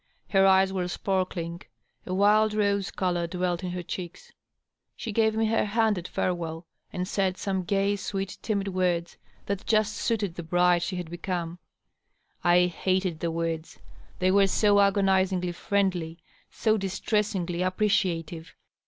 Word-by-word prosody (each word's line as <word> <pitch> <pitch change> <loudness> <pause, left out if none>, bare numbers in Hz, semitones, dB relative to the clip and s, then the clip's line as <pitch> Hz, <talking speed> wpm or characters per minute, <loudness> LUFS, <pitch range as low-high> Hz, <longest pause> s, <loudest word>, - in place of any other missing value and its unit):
Her 195 -1 +4
eyes 190 0 +4
were 180 -2 -1
sparkling; 180 -2 -2 0.5
a 185 - -2
wild 210 +2 +4
rose 200 -2 +1
color 175 -3 -1
dwelt 180 0 -2
in 180 - -2
her 180 0 -4
cheeks; 175 +1 -7 0.6
she 225 - -5
gave 220 0 +2
me 225 0 +2
her 225 +1 +2
hand 220 0 +2
at 175 - -7
ferewell 170 -2 -3 0.3
and 180 0 -3
said 190 -2 0
some 190 -2 -1
gay, 200 +2 +1
sweet, 195 -1 -4
timid 200 -3 -1
words 180 -2 -1 0.3
that 200 -1 -3
just 215 -1 +2
suited 210 -6 -1
the 170 - -6
bride 175 +1 +3
she 185 - -3
had 175 -2 -5
become. 175 -1 -4 0.8
I 175 +1 +5
hated 185 -1 -1
the 170 - -1
words, 165 -1 -3 0.4
they 185 0 +2
were 195 0 +5
so 205 +1 +3
agonizingly 190 -2 +2
friendly, 180 -3 -1 0.3
so 220 -1 +1
distressingly 195 -2 -1
appreciative. 180 -4 -1
185 Hz, 145 wpm, -27 LUFS, 175-200 Hz, 0.8 s, I